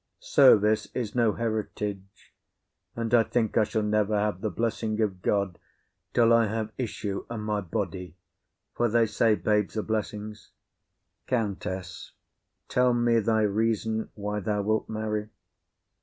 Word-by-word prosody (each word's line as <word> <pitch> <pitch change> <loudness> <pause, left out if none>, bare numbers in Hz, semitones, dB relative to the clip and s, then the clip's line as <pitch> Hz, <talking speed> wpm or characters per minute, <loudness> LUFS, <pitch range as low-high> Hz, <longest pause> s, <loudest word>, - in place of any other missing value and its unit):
Service 110 -5 +5
is 115 -5 -3
no 115 -3 +2
heritage, 105 -3 -4 0.6
and 115 0 -3
I 120 - +7
think 115 -1 -1
I 110 - +5
shall 110 +1 -1
never 105 0 +1
have 105 -3 -1
the 110 - -1
blessing 110 +2 -2
of 100 -4 -1
God 100 -3 0 0.5
till 115 -1 +4
I 115 -1 +4
have 110 +1 -3
issue 105 -5 -4
of 115 -2 -4
my 105 -1 -1
body; 90 -3 -4 0.6
for 120 0 +1
they 115 +1 +3
say 110 0 +2
barnes 105 0 0
are 110 - 0
blessings. 105 -1 -4 0.7
COUNTESS. 95 -6 -3 0.5
Tell 125 -1 +2
me 120 -1 +3
thy 110 0 +2
reason 110 +1 0
why 105 0 -3
thou 105 0 -1
wilt 110 +1 0
marry. 110 -1 -3
110 Hz, 140 wpm, -27 LUFS, 105-115 Hz, 0.7 s, I